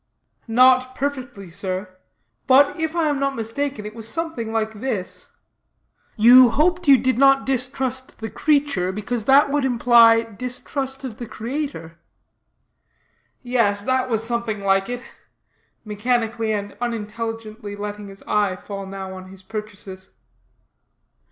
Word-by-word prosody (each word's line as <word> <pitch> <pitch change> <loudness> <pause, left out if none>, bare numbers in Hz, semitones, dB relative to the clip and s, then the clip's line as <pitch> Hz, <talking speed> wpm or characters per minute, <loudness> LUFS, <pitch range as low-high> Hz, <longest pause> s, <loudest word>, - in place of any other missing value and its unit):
"Not 255 +2 +4
perfectly, 250 -10 -5
sir; 185 +1 -5 0.5
but, 275 +4 +5
if 320 +1 -2
I 330 -2 +1
am 290 -2 0
not 275 0 -1
mistaken, 230 +1 -3
it 210 - -7
was 225 -1 -6
something 320 -7 -3
like 220 -1 -2
this: 215 -9 -4 0.9
you 245 +3 +8
hoped 345 +7 +1
you 275 -1 +8
did 255 0 0
not 270 0 +5
distrust 260 0 -2
the 225 - -5
creature; 285 -12 +1
for 210 +5 -3
that 275 +5 +4
would 290 -1 +1
imply 235 -2 +5
distrust 250 +4 -4
of 240 -5 -6
the 240 - -7
Creator." 230 - -5 1.4
"Yes, 230 -5 +1
that 260 +2 0
was 225 -2 0
something 235 -3 -2
like 195 +1 +1
it," 245 0 -5 0.8
mechanically 225 +1 -1
and 205 -1 -3
unintelligently 225 -2 -5
letting 205 0 -6
his 195 0 -13
eye 205 -3 0
fall 195 0 -8
now 190 -1 -7
on 185 0 -10
his 190 0 -13
purchases. 200 -3 -8
230 Hz, 130 wpm, -22 LUFS, 205-260 Hz, 1.4 s, you